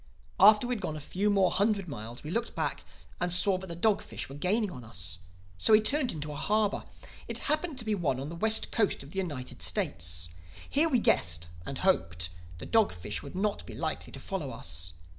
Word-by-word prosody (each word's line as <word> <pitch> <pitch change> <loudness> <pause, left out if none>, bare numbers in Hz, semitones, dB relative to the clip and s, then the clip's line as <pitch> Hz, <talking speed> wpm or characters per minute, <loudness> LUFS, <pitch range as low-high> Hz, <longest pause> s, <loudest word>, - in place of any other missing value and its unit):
"After 210 +3 +8
we 250 - 0
had 220 - -4
gone 160 -4 -3
a - - -5
few 190 +8 -1
more 195 -3 +4
hundred 200 -1 +1
miles 120 -3 -7
we 150 - -5
looked 230 +4 -2
back - - -2 0.4
and 175 0 0
saw 185 +1 +3
that 190 - -7
the 170 - -5
dog 205 +4 +2
fish - - -6
were - - -8
gaining 200 +7 +1
on 125 -7 -9
us. 90 -5 -6 0.4
So 215 - +4
we 215 - +9
turned 260 +5 +3
into 150 -1 -4
a - - -6
harbor. 210 +7 +1 0.4
It - - -1
happened 305 0 0
to 235 - -2
be 215 - +1
one 150 -10 0
on 140 +2 -5
the 170 - -6
west 220 +5 +3
coast 215 -10 +1
of 140 - -12
the 195 - -2
United 145 -9 -5
States. 85 0 0 0.4
Here 310 +4 +2
we 260 - +3
guessed, 85 - +2 0.2
and 135 - -4
hoped, 85 - +1 0.3
the - - -8
dog 225 -2 +3
fish 105 +4 -4
would 140 - -9
not 200 +2 -1
be - - -8
likely - - -3
to - - -6
follow 185 -8 -4
us. 85 -5 -4
180 Hz, 220 wpm, -30 LUFS, 130-215 Hz, 0.4 s, we